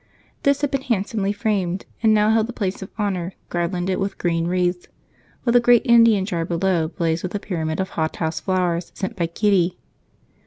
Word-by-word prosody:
This 280 0 +2
had 290 -1 0
been 275 -2 0
handsomely 205 -4 -1
framed 200 -4 -1 0.2
and 220 -1 +4
now 215 0 +4
held 220 0 +2
the 245 - -6
place 195 -3 -3
of 190 - -7
honor, 190 -4 -2 0.2
garlanded 175 +2 -1
with 195 0 -2
green 165 -1 0
wreaths, 180 0 0 0.6
while 235 - +1
the 245 - +7
great 240 +1 +4
Indian 230 -5 +5
jar 175 -5 -2
below 170 -1 0
blazed 165 -1 -1
with 185 +2 -5
a - - 0
pyramid 160 -5 -3
of 190 0 -1
hothouse 160 0 -2
flowers 180 -2 -1
sent 215 +3 -4
by 170 -4 -1
Kitty. 185 0 +1
190 Hz, 185 wpm, -22 LUFS, 175-215 Hz, 0.6 s, the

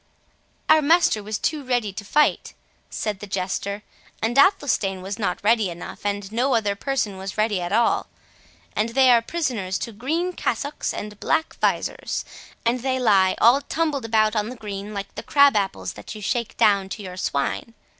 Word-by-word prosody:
"Our 310 0 +6
master 315 -7 +3
was 210 0 -3
too 300 +6 -2
ready 245 -6 -1
to 205 +2 -6
fight," 300 +9 +1 0.3
said 210 -3 -3
the 205 - -8
Jester; 195 +2 -3 0.4
"and 225 +2 -1
Athelstane 270 - +3
was 200 +4 -5
not 195 -4 0
ready 220 -2 +3
enough, 175 +4 -7
and 205 -1 -3
no 250 +4 +1
other 205 -3 +1
person 210 -5 -2
was 195 +2 -6
ready 215 -3 +1
at 175 - -4
all. 230 +3 +2 0.7
And 215 +2 +1
they 260 -2 +6
are 235 -1 +6
prisoners 230 - -2
to 230 - -5
green 320 - -2
cassocks, 285 -3 -2
and 210 -1 -7
black 320 - 0
visors. - - -1 0.4
And 240 +2 +2
they 260 0 0
lie 195 -6 +4
all 245 +5 +6
tumbled 290 -4 -1
about 215 -1 +2
on 210 +1 0
the 250 - -7
green, 205 -2 -7
like 200 0 -5
the - - -6
crab 280 -2 +5
apples 200 -2 -1
that - - -9
you 215 - -8
shake 235 +1 -2
down 200 -2 +3
to 205 +1 -6
your 180 -1 -7
swine. 185 +6 -2
215 Hz, 180 wpm, -23 LUFS, 200-260 Hz, 0.7 s, Our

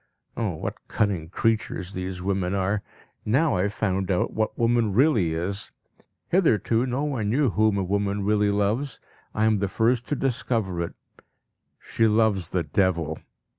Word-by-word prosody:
Oh, - - -2
what - - -6
cunning 95 -6 -1
creatures 110 -2 -1
these 90 -1 -5
women 95 -1 0
are! 100 +2 0 0.4
Now 135 - +2
I - - +1
have 100 +2 -1
found 95 -2 -1
out 90 -2 0
what 110 0 -1
woman 115 -3 +2
really 110 - +3
is. 95 +5 -3 0.6
Hitherto 125 - +2
no 130 +3 -1
one 130 -8 -1
knew 130 +1 +2
whom 110 -1 +2
a 100 - 0
woman 100 +1 -1
really 105 0 +2
loves; 105 +7 0 0.4
I 110 - +2
am 110 -2 +3
the 100 - 0
first 115 +4 +1
to 145 - 0
discover 115 -8 -1
it 85 - -4 0.8
she 115 - +1
loves 105 -5 +2
the 90 -2 0
devil. 80 -1 0
105 Hz, 160 wpm, -25 LUFS, 95-115 Hz, 0.8 s, really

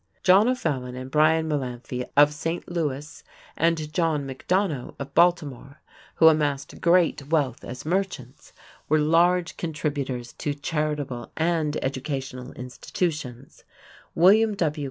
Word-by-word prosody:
John 195 +4 +6
O'Fallon 140 - -2
and 130 +1 -7
Bryan 160 +1 +3
Mullanphy 125 -3 -4
of 145 +1 +6
St. 165 +3 -4
Louis, 150 -4 -4 0.3
and 160 -2 0
John 160 -4 0
McDonough 150 +1 -2
of 140 - -7
Baltimore, 155 -5 +1 0.4
who 160 - +6
amassed 145 -3 +1
great 170 -5 +3
wealth 145 -6 0
as 125 +3 -8
merchants, 175 -8 -3 0.4
were 155 - +4
large 170 +3 +2
contributors 140 -6 -3
to 145 -1 -2
charitable 145 -4 -3
and 160 -2 0
educational 135 -1 -4
institutions; 130 0 -5 0.5
William 210 +5 +5
W. 155 -5 -1
150 Hz, 115 wpm, -25 LUFS, 135-165 Hz, 0.5 s, John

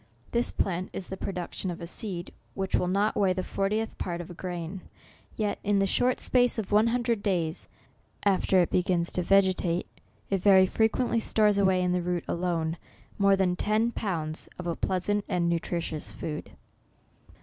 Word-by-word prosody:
This 235 +1 +2
plant 185 -1 -2
is 185 - -5
the 190 - -4
production 185 0 -4
of 175 - -5
a 170 - -6
seed 180 0 -4 0.2
which 190 -1 -3
will 180 - +2
not 200 +4 +1
weigh 195 -2 +3
the 185 0 -2
fortieth 210 +4 -1
part 175 -1 -3
of 175 0 -7
a - - -7
grain; 175 +1 -5 0.5
yet, 210 -2 -1
in 205 -1 +2
the 195 - +3
short 250 +6 +1
space 245 -2 +3
of 215 -3 -3
one 210 +2 +5
hundred 235 -2 0
days 175 -6 -1 0.6
after 190 -2 +4
it - - -4
begins 175 -1 +1
to 180 - -1
vegetate, 185 -2 +2 0.5
it 195 -2 +1
very 190 -1 +7
frequent 220 +5 +1
ly 230 - +3
stores 210 -2 +3
away 190 -2 +3
in 180 - +1
the 180 0 +1
root 175 -1 -1
alone, 170 -2 -1 0.4
more 200 0 +5
than 185 -2 +1
ten 215 +5 +1
pounds 165 -9 -3
of 180 - -7
a 170 -1 -1
pleasant 200 +3 0
and 180 -3 +1
nutritious 170 -2 -2
food. 150 -1 -5
185 Hz, 180 wpm, -28 LUFS, 175-205 Hz, 0.6 s, very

